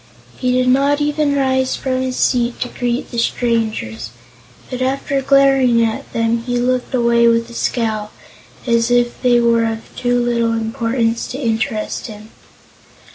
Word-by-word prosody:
He 250 -1 -1
did 255 0 +1
not 280 +3 +3
even 295 -1 0
rise 260 -1 +1
from 255 -1 -2
his 260 -1 -2
seat 240 -1 +1
to 250 - -2
greet 245 0 -3
the 235 - -2
strangers, 225 - -1 0.6
but 255 -1 -5
after 275 +1 -1
glaring 270 -3 +4
at 220 -1 -4
them 230 0 0
he 245 +1 -2
looked 250 +1 -1
away 235 -1 +3
with 230 0 +2
a - - -11
scowl, 220 -3 -2 0.6
as 235 -1 +2
if 245 0 +1
they 245 -2 +4
were 235 -1 +3
of 225 0 -5
too 245 0 0
little 235 -1 0
importance 230 0 -1
to 255 - -6
interest 225 -2 -2
him. 215 0 -11
240 Hz, 155 wpm, -18 LUFS, 230-255 Hz, 0.6 s, glaring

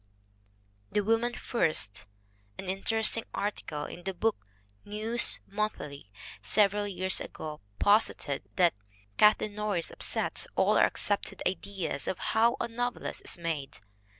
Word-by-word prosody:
The 210 - +2
woman 225 +3 +1
first 155 - -1 0.5
An - - -7
interesting 220 +4 +2
article 155 -7 -3
in 175 - -9
the 195 0 -4
Book 210 - -1 0.4
News 220 +3 +3
Monthly 195 - -4 0.3
several 205 - +3
years 185 -1 +2
ago 155 -1 -7 0.2
posited 205 - +2
that 175 -2 +4 0.4
"Kath 210 0 +6
leen 210 - -3
Norris 205 -5 -1
upsets - - 0
all - - +3
our - - +7
accepted 205 -1 0
ideas 190 -1 -4
of - - -1 0.2
how 230 +3 +4
a - - -1
novelist 245 +1 -3
is - - 0
made. 165 -5 -4
205 Hz, 125 wpm, -29 LUFS, 170-220 Hz, 0.5 s, our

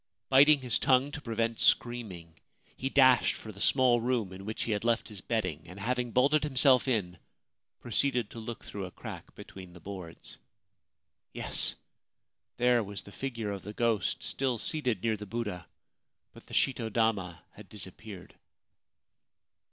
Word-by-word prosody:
Biting 140 +2 +7
his 125 -3 +1
tongue 130 +2 +3
to 145 - -7
prevent 115 -2 -2
screaming, 95 -9 +1 0.4
he 135 - -3
dashed 130 -3 +5
for 110 - -9
the 100 -1 -12
small 125 -2 +4
room 115 -6 -1
in 95 +1 -10
which 110 +1 -3
he 115 - -3
had 105 0 -1
left 115 0 +1
his 105 -3 -10
bedding, 105 -10 -2
and, 90 +4 -10
having 125 +3 -1
bolted 140 +6 +3
himself 135 -2 +4
in, 100 -8 -1 0.6
proceeded 120 -1 0
to 115 - -8
look 115 +1 -7
through 100 -2 -6
a - - -12
crack - - -10
between 90 -2 -11
the 85 - -13
boards. 90 -3 -10 0.9
Yes! - - 0 0.8
there 120 -1 +3
was 100 0 -5
the 100 - -13
figure 115 -4 -4
of 100 -1 -5
the 105 - -8
ghost, 115 -4 0
still 130 -3 0
seated 125 - -1
near 110 -2 +1
the 105 0 -9
Buddha; 105 -5 -4 0.7
but - - -16
the - - -7
shito 120 -4 +1
dama 100 -7 0
had 105 -3 -14
disappeared. 100 -1 -9
115 Hz, 160 wpm, -30 LUFS, 100-125 Hz, 0.9 s, Biting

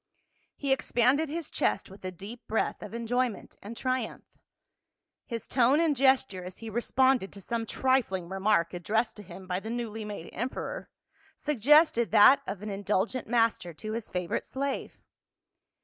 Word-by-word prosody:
He 280 -2 -2
expanded 270 +3 +2
his 330 +1 -4
chest 195 - 0
with 195 - -14
a 185 - -3
deep 200 +7 -10
breath 220 - -1
of 210 +2 -8
enjoy 245 +2 +1
ment 215 - -12
and 225 +3 -8
triumph; 255 -3 -2 1.0
his 230 -3 -5
tone 260 +3 +4
and 325 -3 +2
gesture, 265 -8 +2
as 180 0 -9
he 225 -1 -8
re 235 +3 -1
sponded 260 -5 +2
to 200 - -11
some 225 +3 -3
trifling 235 -11 +1
remark 190 -2 +1
addressed 220 +6 0
to - - -8
him 190 -1 -11
by 180 0 -2
the 220 - -7
newly 225 -2 -4
made 205 -5 -7
emperor, 260 - -4 0.5
suggested 295 -2 +4
that 220 +6 +7
of 200 0 -5
an 210 - -4
indul 200 0 0
gent 255 -2 -5
master 225 -7 +1
to 215 +6 -6
his 225 0 -4
favorite 180 -2 -2
slave. 275 0 -3
225 Hz, 165 wpm, -29 LUFS, 195-260 Hz, 1.0 s, that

